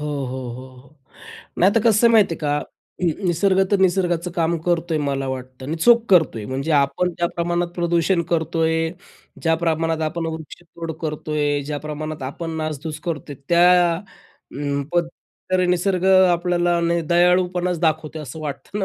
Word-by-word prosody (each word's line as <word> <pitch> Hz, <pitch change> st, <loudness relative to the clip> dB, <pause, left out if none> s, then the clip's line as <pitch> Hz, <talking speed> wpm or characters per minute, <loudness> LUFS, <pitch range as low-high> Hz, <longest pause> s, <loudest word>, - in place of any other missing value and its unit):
हो, 150 Hz, -, -4 dB, 0.2 s
हो, 130 Hz, 0 st, -5 dB
हो, 130 Hz, +2 st, -9 dB
हो, 140 Hz, +3 st, -23 dB, 0.6 s
नाही. 190 Hz, +3 st, +5 dB
तर 230 Hz, -, +3 dB
कसं 220 Hz, +1 st, +4 dB
आहे 230 Hz, -, +4 dB
माहिती 210 Hz, -6 st, +4 dB
आहे -, -, -12 dB
का. 145 Hz, -1 st, 0 dB, 0.5 s
हं, -, -, +2 dB
नि 165 Hz, -, +2 dB, 0.2 s
निसर्ग 190 Hz, +3 st, +2 dB
तर 200 Hz, -, +3 dB
निसर्गाचं 175 Hz, -1 st, 0 dB
काम 170 Hz, -1 st, 0 dB
करतो 170 Hz, -1 st, 0 dB
आहे -, -, +1 dB
मला 135 Hz, -1 st, -2 dB
वाटतं 130 Hz, 0 st, -7 dB
आणि 160 Hz, +4 st, -3 dB
चोख 235 Hz, -1 st, +6 dB
करतो 160 Hz, -10 st, +4 dB
आहे. 105 Hz, -, -6 dB
म्हणजे 135 Hz, +4 st, -3 dB
आपण 140 Hz, +6 st, 0 dB
ज्या 170 Hz, -, +2 dB
प्रमाणात 175 Hz, 0 st, 0 dB
प्रदूषण 170 Hz, +1 st, +1 dB
करतो 165 Hz, 0 st, 0 dB
आहे, 160 Hz, 0 st, +1 dB, 0.5 s
ज्या 165 Hz, -1 st, +3 dB
प्रमाणात 165 Hz, -1 st, 0 dB
आपण 165 Hz, +1 st, -4 dB
वृक्षतोड 165 Hz, +1 st, -7 dB
करतो 155 Hz, -1 st, -4 dB
आहे, 145 Hz, -1 st, +1 dB
ज्या 150 Hz, -1 st, -2 dB
प्रमाणात 155 Hz, 0 st, -5 dB
आपण 165 Hz, +2 st, -6 dB
नासधूस 155 Hz, 0 st, -4 dB
करतो 155 Hz, -3 st, -4 dB
आहे, -, -, -7 dB
त्या 175 Hz, 0 st, +5 dB
अं, 145 Hz, -6 st, -6 dB
पण 175 Hz, -1 st, +2 dB, 0.5 s
तरी 185 Hz, -1 st, +3 dB
निसर्ग 180 Hz, +1 st, 0 dB
अ, 190 Hz, -1 st, +6 dB
आपल्याला 175 Hz, 0 st, +1 dB, 0.3 s
दयाळूपणाच 180 Hz, 0 st, +2 dB
दाखवतो, 160 Hz, -1 st, 0 dB
असं 150 Hz, +3 st, -8 dB
वाटतं 155 Hz, +7 st, -6 dB
ना 195 Hz, -, 0 dB
165 Hz, 180 wpm, -21 LUFS, 150-175 Hz, 0.6 s, चोख